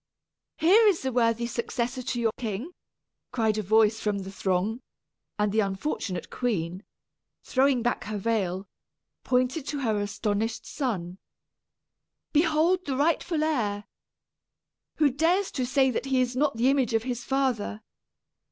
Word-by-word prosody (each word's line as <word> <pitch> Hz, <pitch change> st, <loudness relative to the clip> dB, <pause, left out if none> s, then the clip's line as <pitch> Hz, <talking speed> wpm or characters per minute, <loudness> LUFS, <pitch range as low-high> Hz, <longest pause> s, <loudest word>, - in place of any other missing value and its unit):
"Here 410 Hz, +8 st, +6 dB
is 360 Hz, -9 st, +2 dB
a 260 Hz, -, 0 dB
worthy 235 Hz, -1 st, +2 dB
successor 240 Hz, +2 st, -2 dB
to 245 Hz, 0 st, -3 dB
your 230 Hz, -2 st, +2 dB
king!" 230 Hz, -, -4 dB, 0.6 s
cried 220 Hz, -3 st, +1 dB
a -, -, +1 dB
voice 220 Hz, +2 st, +3 dB
from 210 Hz, -1 st, -1 dB
the 195 Hz, 0 st, -6 dB
throng; 195 Hz, +5 st, -1 dB, 0.6 s
and 210 Hz, -1 st, +1 dB
the 220 Hz, -, +1 dB
unfortunate 195 Hz, -, -2 dB
queen, 185 Hz, -6 st, -2 dB, 0.6 s
throwing 265 Hz, -2 st, +2 dB
back 240 Hz, -, -1 dB
her 215 Hz, 0 st, -3 dB
veil, 195 Hz, -3 st, -1 dB, 0.6 s
pointed 255 Hz, +3 st, 0 dB
to 290 Hz, -2 st, -3 dB
her 220 Hz, -5 st, +1 dB
astonished 210 Hz, +2 st, -2 dB
son. 190 Hz, -, -3 dB, 1.1 s
"Behold 325 Hz, +3 st, +3 dB
the 265 Hz, -2 st, -1 dB
rightful 315 Hz, +1 st, +1 dB
heir! 215 Hz, -10 st, 0 dB, 1.1 s
Who 295 Hz, -3 st, +3 dB
dares 340 Hz, +8 st, +1 dB
to 255 Hz, -4 st, -2 dB
say 265 Hz, 0 st, +3 dB
that 250 Hz, -, -2 dB
he 265 Hz, -1 st, +2 dB
is 250 Hz, -1 st, 0 dB
not 275 Hz, -3 st, +1 dB
the 250 Hz, +4 st, +4 dB
image 260 Hz, -5 st, +1 dB
of 225 Hz, -, +1 dB
his 245 Hz, -1 st, -3 dB
father? 250 Hz, -5 st, -1 dB
240 Hz, 145 wpm, -27 LUFS, 210-275 Hz, 1.1 s, Here